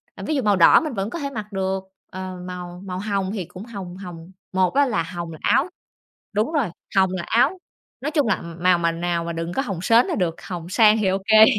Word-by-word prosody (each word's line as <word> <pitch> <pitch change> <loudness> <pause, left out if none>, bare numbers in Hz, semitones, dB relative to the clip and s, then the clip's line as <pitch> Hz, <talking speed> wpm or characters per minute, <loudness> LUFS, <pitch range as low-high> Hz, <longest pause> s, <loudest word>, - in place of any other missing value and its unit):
ờ, - - -8
ví 310 - 0
dụ 270 - +1
màu 210 -3 +3
đỏ 170 -3 +7
mình 305 -5 -3
vẫn 195 0 -2
có 340 - -5
thể 280 -2 -3
mặc 215 -4 -6
được, 190 0 -1 0.3
ờ, 185 0 -6
màu 180 0 -7
màu 185 -1 -4
hồng 200 -2 -1
thì 190 -6 -3
cũng 185 +6 -10
hồng 190 -6 -8
hồng, 180 -2 -9 0.2
một 185 +2 +2
á 285 +1 +4
là 190 -10 0
hồng 170 0 -6
là 160 - -8
áo 310 - +3 0.6
đúng 215 +10 0
rồi, 280 - +1 0.3
hồng 190 -1 +5
là 185 - -2
áo, 245 +11 +3 0.4
nói 285 +4 -2
chung 295 -5 +2
là, 220 - 0
m 170 +1 -9
màu 180 -1 +5
mà 170 -1 +1
nào 170 0 -1
mà 170 - -3
đừng 165 +1 -4
có 270 - 0
hồng 195 -9 -4
sến 230 +4 +5
là - - -1
được, 175 -4 0
hồng 175 -2 -6
sang 215 +2 +5
thì 210 - +1
ô 190 +1 +2
kê. 220 0 +9
190 Hz, 255 wpm, -23 LUFS, 175-220 Hz, 0.6 s, kê